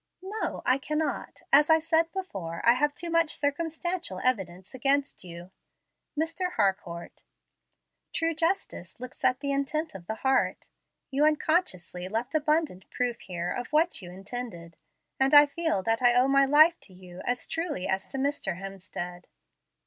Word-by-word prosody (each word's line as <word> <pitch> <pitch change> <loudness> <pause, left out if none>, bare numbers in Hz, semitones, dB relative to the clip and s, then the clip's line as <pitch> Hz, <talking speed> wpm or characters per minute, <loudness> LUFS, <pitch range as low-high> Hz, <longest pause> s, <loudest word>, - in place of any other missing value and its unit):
"No, 415 +3 -4
I 255 +2 +3
cannot. 305 +3 -3
As 295 +2 +7
I 320 - +7
said 325 +1 +1
before, 195 - -5
I 235 - +8
have 290 +3 +1
too 345 -1 -5
much 330 -2 +2
circumstantial 325 - -2
evidence 190 -7 -1
against 275 0 0
you. 175 +1 -10 0.7
Mr. 330 +3 -1
Harcourt, 190 -4 -2 0.9
true 330 0 0
justice 325 - -2
looks 255 +1 -10
at 255 - +2
the 280 -1 -1
intent 280 +3 -1
of 180 -3 -10
the 220 - -3
heart. 265 +3 0 0.4
You 275 +2 +2
unconsciously 295 - +1
left 230 +7 -3
abundant 305 - 0
proof 245 -1 -2
here 175 -1 -4
of 245 - -4
what 315 0 +2
you 175 - -9
intended, 190 -3 -7 0.4
and 270 +2 +4
I 290 0 +10
feel 285 - -1
that 225 +3 0
I 245 -1 +5
owe 250 +2 +5
my 275 0 +5
life 310 +5 +6
to 190 - -14
you 180 0 -11
as 245 0 -2
truly 325 - -2
as 190 0 -1
to 270 - -5
Mr. 270 -10 -1
Hemstead. 185 -2 -7
265 Hz, 155 wpm, -28 LUFS, 190-310 Hz, 0.9 s, I